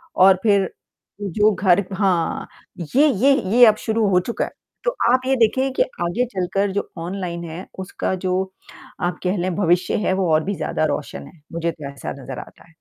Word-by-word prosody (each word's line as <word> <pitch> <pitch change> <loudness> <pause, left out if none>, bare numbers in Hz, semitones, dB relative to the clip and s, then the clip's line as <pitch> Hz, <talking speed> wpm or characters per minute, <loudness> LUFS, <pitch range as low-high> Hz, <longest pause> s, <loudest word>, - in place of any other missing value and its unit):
और 190 +1 +7
फिर 200 -3 +4 0.5
तो 205 -1 -3
जो 210 +2 +4
घर 190 +1 +3
हाँ, 190 -4 0 0.5
ये 295 +3 +6
ये 270 +1 +4 0.2
ये 245 - +10
अब 215 - +6
शुरू 220 -1 +1
हो 180 - +4
चुका 230 +6 -2
है। - - -9 0.3
तो - - +2 0.2
आप 255 +1 +4
ये 265 +1 +2
देखें 260 +3 +2
कि - - +3 0.2
आगे 185 +9 0
चलकर 195 +2 0
जो 200 - -3
ऑनलाइन 175 -1 -4
है 170 +4 -7
उसका 190 0 -3
जो, 185 +1 -1 0.5
आप 175 -1 -1
कह 185 +2 0
लें 180 0 -1
भविष्य 175 -2 +2
है - - +2
वो 190 -2 0
और 155 0 +3
भी 200 +1 -2
ज़्यादा - - -1
रोशन 70 - -4
है, 160 - -18
मुझे 170 0 -1
तो 150 -3 -8
ऐसा 140 - -6
नज़र 130 0 -7
आता - - -13
है। 165 - -23
190 Hz, 200 wpm, -21 LUFS, 175-210 Hz, 0.5 s, ये